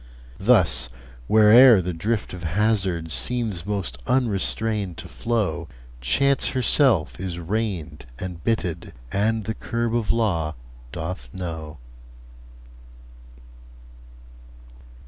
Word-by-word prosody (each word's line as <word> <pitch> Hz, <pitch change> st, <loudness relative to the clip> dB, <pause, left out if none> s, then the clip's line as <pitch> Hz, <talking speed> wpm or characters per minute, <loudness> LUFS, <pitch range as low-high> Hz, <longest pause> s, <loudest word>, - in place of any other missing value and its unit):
Thus, 60 Hz, +1 st, +3 dB, 0.4 s
where'er 110 Hz, +2 st, +7 dB
the 90 Hz, 0 st, -3 dB
drift 105 Hz, +7 st, -2 dB
of 90 Hz, -, -7 dB
hazard 95 Hz, -2 st, 0 dB
Seems 110 Hz, -5 st, -2 dB
most 90 Hz, -12 st, -3 dB
unrestrained 110 Hz, -5 st, 0 dB
to -, -, -8 dB
flow, 105 Hz, -8 st, -2 dB, 0.3 s
Chance 140 Hz, -, +2 dB
herself 120 Hz, -, +2 dB
is 90 Hz, -2 st, -4 dB
reined 85 Hz, -, -3 dB
and 90 Hz, -2 st, -7 dB
bitted, 90 Hz, -7 st, -2 dB, 0.2 s
And 110 Hz, +2 st, 0 dB
the 110 Hz, -, -3 dB
curb 115 Hz, 0 st, -3 dB
of 115 Hz, -3 st, +1 dB
law 85 Hz, -9 st, 0 dB, 0.4 s
doth 85 Hz, +5 st, -6 dB
know. 80 Hz, -4 st, -6 dB
95 Hz, 95 wpm, -23 LUFS, 85-115 Hz, 0.4 s, where'er